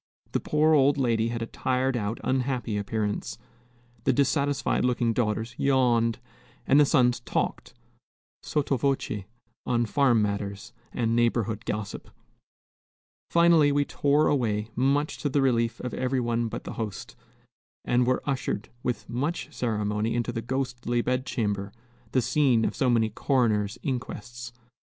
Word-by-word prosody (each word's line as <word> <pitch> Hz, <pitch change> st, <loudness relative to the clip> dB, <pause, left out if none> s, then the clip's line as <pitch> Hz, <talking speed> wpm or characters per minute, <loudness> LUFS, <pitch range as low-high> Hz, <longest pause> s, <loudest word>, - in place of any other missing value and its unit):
The -, -, 0 dB
poor 155 Hz, +1 st, +2 dB
old 140 Hz, -1 st, +4 dB
lady 115 Hz, -4 st, +1 dB
had 115 Hz, 0 st, -3 dB
a -, -, -2 dB
tired 130 Hz, +2 st, -1 dB
out, 110 Hz, -1 st, -2 dB
unhappy 130 Hz, -4 st, -1 dB
appearance, 105 Hz, 0 st, -2 dB, 0.7 s
the 135 Hz, -, +3 dB
dissatisfied 140 Hz, +1 st, +1 dB
looking 120 Hz, -2 st, +1 dB
daughters 110 Hz, 0 st, -1 dB
yawned, 120 Hz, -4 st, +2 dB, 0.5 s
and 140 Hz, -, +5 dB
the 145 Hz, -, +6 dB
sons 125 Hz, -4 st, +3 dB
talked, -, -, -3 dB, 0.7 s
sotto 145 Hz, -2 st, 0 dB
voce, 125 Hz, -6 st, -1 dB, 0.4 s
on 120 Hz, -1 st, +2 dB
farm 130 Hz, -1 st, +3 dB
matters 100 Hz, +2 st, -3 dB, 0.2 s
and 115 Hz, -2 st, 0 dB
neighborhood 115 Hz, -2 st, 0 dB
gossip. 105 Hz, -1 st, -4 dB, 1.2 s
Finally, 170 Hz, -3 st, +5 dB
we 145 Hz, 0 st, +2 dB
tore 145 Hz, +2 st, +2 dB
away, 110 Hz, -6 st, 0 dB
much 140 Hz, +4 st, +1 dB
to 145 Hz, -, -1 dB
the 140 Hz, -, +1 dB
relief 115 Hz, -3 st, +1 dB
of 125 Hz, -, -5 dB
every 130 Hz, 0 st, 0 dB
one 120 Hz, -1 st, 0 dB
but -, -, -6 dB
the -, -, -6 dB
host, 105 Hz, -4 st, -6 dB, 0.7 s
and 120 Hz, 0 st, +2 dB
were 130 Hz, -, +1 dB
ushered 130 Hz, -5 st, -2 dB
with 125 Hz, -2 st, -3 dB
much 150 Hz, +5 st, -3 dB
ceremony 105 Hz, -2 st, -1 dB
into 120 Hz, 0 st, -1 dB
the 115 Hz, -1 st, -3 dB
ghostly 120 Hz, -1 st, -2 dB
bed 130 Hz, +1 st, -1 dB
chamber, 105 Hz, -4 st, -2 dB, 0.4 s
the 130 Hz, -, +2 dB
scene 130 Hz, -4 st, +3 dB
of -, -, -2 dB
so 130 Hz, -, +1 dB
many 115 Hz, -2 st, +2 dB
coroner's 110 Hz, -5 st, +1 dB
inquests. 120 Hz, -2 st, -5 dB
120 Hz, 140 wpm, -27 LUFS, 115-135 Hz, 1.2 s, the